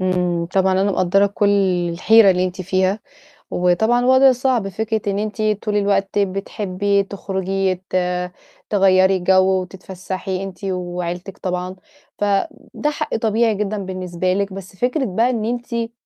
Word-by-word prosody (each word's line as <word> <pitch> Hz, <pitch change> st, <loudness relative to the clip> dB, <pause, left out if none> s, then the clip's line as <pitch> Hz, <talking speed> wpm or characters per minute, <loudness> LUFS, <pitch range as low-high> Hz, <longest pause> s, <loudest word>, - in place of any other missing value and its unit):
إمم، 180 Hz, -2 st, 0 dB
طبعًا 190 Hz, +1 st, +1 dB
أنا 195 Hz, +2 st, +2 dB
مقدّرة 190 Hz, +3 st, +3 dB
كل 200 Hz, 0 st, 0 dB, 0.4 s
الحيرة 215 Hz, +3 st, +5 dB
اللي 180 Hz, 0 st, +1 dB
أنتِ 185 Hz, +1 st, -4 dB
فيها 190 Hz, +2 st, 0 dB, 0.5 s
وطبعًا 220 Hz, +8 st, +2 dB
وَضع 260 Hz, +1 st, +6 dB
صعب 250 Hz, -4 st, 0 dB
فكرة 220 Hz, +2 st, -2 dB
إن 200 Hz, -, -2 dB
أنتِ 215 Hz, +1 st, -4 dB
طول 210 Hz, 0 st, -1 dB
الوقت 200 Hz, 0 st, +1 dB
بتحبّي 200 Hz, 0 st, -1 dB
تخرُجي 195 Hz, -1 st, -2 dB
ت -, -, -4 dB, 0.7 s
تغيّري 190 Hz, -1 st, +4 dB
جَو 190 Hz, +1 st, +3 dB
وتتفسّحي 185 Hz, +1 st, -6 dB
أنتِ 195 Hz, +1 st, -9 dB
وعيلتِك 180 Hz, 0 st, -4 dB
طبعًا، 180 Hz, 0 st, -4 dB, 0.4 s
فده 205 Hz, +8 st, -2 dB
حق 305 Hz, +1 st, -3 dB
طبيعي 225 Hz, 0 st, +1 dB
جدًا 210 Hz, +1 st, -2 dB
بالنسبة 185 Hz, -1 st, -2 dB
لِك، 200 Hz, 0 st, -2 dB
بس 190 Hz, 0 st, -9 dB
فكرة 255 Hz, +6 st, 0 dB
بقى 225 Hz, +5 st, +1 dB
إن 225 Hz, -4 st, -1 dB
أنتِ 235 Hz, -1 st, -3 dB
195 Hz, 140 wpm, -20 LUFS, 185-215 Hz, 0.7 s, وَضع